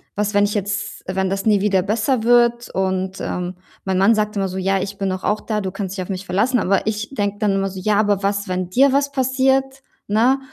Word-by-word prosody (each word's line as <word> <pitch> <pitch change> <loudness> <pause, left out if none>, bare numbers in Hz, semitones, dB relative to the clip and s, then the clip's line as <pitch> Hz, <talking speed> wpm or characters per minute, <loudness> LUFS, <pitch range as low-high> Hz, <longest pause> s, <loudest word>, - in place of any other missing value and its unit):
was, 210 +1 -1
wenn 205 0 +4
ich 205 - -2
jetzt 205 0 -2
wenn 190 0 -1
das 195 0 -3
nie 210 -3 +3
wieder 195 -2 +2
besser 220 +5 0
wird?“ 240 0 +3
Und, 190 0 -1
ähm, 180 0 -3 0.3
mein 190 -1 -1
Mann 205 +4 +5
sagt 210 0 -1
immer 195 - 0
so: 185 0 -6
„Ja, 195 0 +1
ich 200 +1 -5
bin 195 -1 -1
doch 185 0 -4
auch 210 0 0
da. 215 -2 -2
Du 190 - -3
kannst 195 -1 -5
dich 185 - -2
auf - - -12
mich 190 0 -4
verlassen.“ 225 +7 +1
Aber 195 +1 +1
ich 215 0 -2
denke 205 -4 -1
dann 210 -2 +2
immer 195 0 0
so: 190 - -8
„Ja, 205 +2 +1
aber 205 -2 +1
was, 200 +1 -1
wenn 185 -1 -2
dir 265 +7 +4
was 280 0 +1
passiert, 265 0 +1 0.2
ne? 235 +6 +3
205 Hz, 245 wpm, -20 LUFS, 190-225 Hz, 0.3 s, Mann